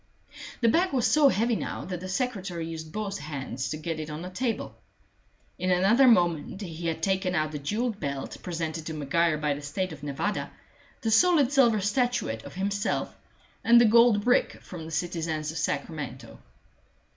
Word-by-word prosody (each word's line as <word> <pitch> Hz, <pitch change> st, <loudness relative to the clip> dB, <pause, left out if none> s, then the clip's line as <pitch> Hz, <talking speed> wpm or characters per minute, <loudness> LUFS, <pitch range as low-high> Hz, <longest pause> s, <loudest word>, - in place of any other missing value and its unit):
The 230 Hz, -, +4 dB
bag 345 Hz, +9 st, +3 dB
was 250 Hz, -4 st, +2 dB
so 300 Hz, -2 st, +5 dB
heavy 230 Hz, +1 st, +1 dB
now -, -, -4 dB
that 180 Hz, -1 st, -4 dB
the 185 Hz, +1 st, -7 dB
secretary 190 Hz, -6 st, -2 dB
used 160 Hz, -1 st, -7 dB
both 205 Hz, 0 st, -4 dB
hands 135 Hz, -4 st, -5 dB
to 155 Hz, -, -3 dB
get 160 Hz, 0 st, -4 dB
it 155 Hz, 0 st, -5 dB
on 150 Hz, +2 st, -6 dB
the 180 Hz, -, -7 dB
table. 230 Hz, +4 st, -2 dB, 0.9 s
In 185 Hz, +1 st, -1 dB
another 195 Hz, +9 st, +5 dB
moment 175 Hz, -5 st, +3 dB
he 170 Hz, -3 st, -5 dB
had 160 Hz, 0 st, -3 dB
taken 190 Hz, -1 st, +1 dB
out 155 Hz, -1 st, 0 dB
the 150 Hz, -, -5 dB
jewelled 215 Hz, -, -2 dB
belt 140 Hz, -3 st, -4 dB
presented 165 Hz, -2 st, -4 dB
to 160 Hz, -, -4 dB
Maguire 155 Hz, +2 st, +1 dB
by 150 Hz, -1 st, 0 dB
the 145 Hz, -, -7 dB
State 185 Hz, +6 st, -3 dB
of -, -, -11 dB
Nevada, 150 Hz, +8 st, -2 dB, 0.5 s
the 225 Hz, -3 st, 0 dB
solid 295 Hz, +1 st, +5 dB
silver 240 Hz, -7 st, +4 dB
statuette 210 Hz, -, 0 dB
of -, -, -10 dB
himself, 200 Hz, +2 st, -1 dB, 0.5 s
and 235 Hz, +1 st, +7 dB
the 240 Hz, -, +6 dB
gold 230 Hz, -2 st, +5 dB
brick 245 Hz, 0 st, +3 dB
from 170 Hz, -3 st, -8 dB
the 160 Hz, -, -8 dB
citizens 160 Hz, -2 st, -2 dB
of 160 Hz, -, -5 dB
Sacramento. 140 Hz, -5 st, -4 dB
180 Hz, 180 wpm, -27 LUFS, 155-220 Hz, 0.9 s, and